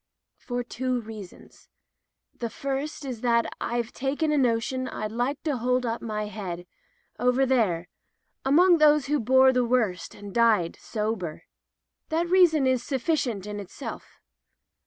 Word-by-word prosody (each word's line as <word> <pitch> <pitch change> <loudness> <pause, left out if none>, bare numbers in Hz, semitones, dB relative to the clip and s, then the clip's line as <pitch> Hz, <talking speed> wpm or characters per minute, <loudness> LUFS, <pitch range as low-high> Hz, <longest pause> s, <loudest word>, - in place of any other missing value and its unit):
"For 245 -1 -3
two 255 +1 -2
reasons. 215 -5 -11 0.6
The 235 - -4
first 275 +5 -4
is 250 -4 -5
that 235 -2 +3 0.2
Tve 240 -1 -2
taken 290 +4 -1
a 300 - +2
notion 255 +1 0
I'd 215 -4 -4
like 250 +5 -2
to 300 -4 0
hold 250 +1 +1
up 230 0 -2
my 215 -2 -3
head, 185 -5 -6 0.5
over 250 +2 +3
there, 205 -10 +1 0.6
among 340 +6 +5
those 300 -2 +5
who 295 +2 +1
bore 260 +3 +5
the 250 -1 +2
worst 230 -8 0
and 205 -1 -10
died 220 -8 +3
sober. 210 -7 -3 0.7
That 330 +2 0
reason 345 -6 +5
is 260 -2 +2
suflicient 260 - -1
in 210 0 -5
itself. 200 - -8
245 Hz, 140 wpm, -26 LUFS, 215-270 Hz, 0.7 s, among